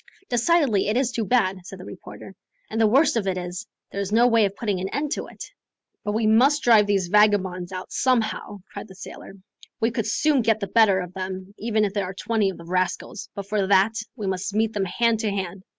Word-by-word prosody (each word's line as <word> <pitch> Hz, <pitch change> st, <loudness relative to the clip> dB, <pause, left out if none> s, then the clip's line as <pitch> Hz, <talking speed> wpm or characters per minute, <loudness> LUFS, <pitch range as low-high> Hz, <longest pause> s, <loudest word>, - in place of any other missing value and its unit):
"Decidedly 245 Hz, -, +2 dB
it 215 Hz, +3 st, +1 dB
is 255 Hz, -2 st, +1 dB
too 230 Hz, -2 st, -2 dB
bad," 195 Hz, -4 st, +1 dB
said 190 Hz, +2 st, -10 dB
the 185 Hz, -, -10 dB
reporter; -, -, -11 dB, 0.4 s
"and 225 Hz, -, 0 dB
the 220 Hz, -, +5 dB
worst 270 Hz, +7 st, +4 dB
of 215 Hz, -4 st, -1 dB
it 185 Hz, -1 st, 0 dB
is, 180 Hz, +4 st, -6 dB, 0.2 s
there 200 Hz, -, -3 dB
is 200 Hz, 0 st, -4 dB
no 230 Hz, +3 st, +5 dB
way 230 Hz, -3 st, +4 dB
of 195 Hz, 0 st, -3 dB
putting 205 Hz, -5 st, -2 dB
an 190 Hz, +1 st, -3 dB
end 285 Hz, +3 st, -2 dB
to -, -, -3 dB
it." -, -, -10 dB, 0.6 s
"But 210 Hz, -, -2 dB
we 220 Hz, +1 st, 0 dB
must 260 Hz, +7 st, +4 dB
drive 220 Hz, -4 st, +5 dB
these 195 Hz, -3 st, +1 dB
vagabonds 190 Hz, -3 st, +2 dB
out 185 Hz, -1 st, -7 dB
somehow," 220 Hz, -5 st, 0 dB
cried -, -, -7 dB
the 190 Hz, -, -14 dB
sailor. 195 Hz, -, -10 dB, 0.4 s
"We 225 Hz, +1 st, +1 dB
could 225 Hz, -2 st, -2 dB
soon 300 Hz, -4 st, +2 dB
get 220 Hz, -1 st, +2 dB
the 200 Hz, -, -2 dB
better 200 Hz, -3 st, +4 dB
of 180 Hz, 0 st, -8 dB
them, 190 Hz, +1 st, -6 dB
even 220 Hz, -1 st, +1 dB
if 200 Hz, -, -3 dB
there 200 Hz, -2 st, -1 dB
are 185 Hz, +1 st, -7 dB
twenty 215 Hz, 0 st, 0 dB
of 190 Hz, -, -7 dB
the 170 Hz, -, -12 dB
rascals; 185 Hz, +5 st, -2 dB
but 200 Hz, -, -5 dB
for 200 Hz, -1 st, -1 dB
that, 200 Hz, +2 st, +4 dB, 0.2 s
we 215 Hz, -5 st, -5 dB
must 190 Hz, +1 st, -3 dB
meet 220 Hz, 0 st, +1 dB
them 200 Hz, -2 st, -1 dB
hand 230 Hz, +4 st, +1 dB
to 220 Hz, -1 st, 0 dB
hand. 190 Hz, -1 st, -4 dB
210 Hz, 230 wpm, -24 LUFS, 190-230 Hz, 0.6 s, the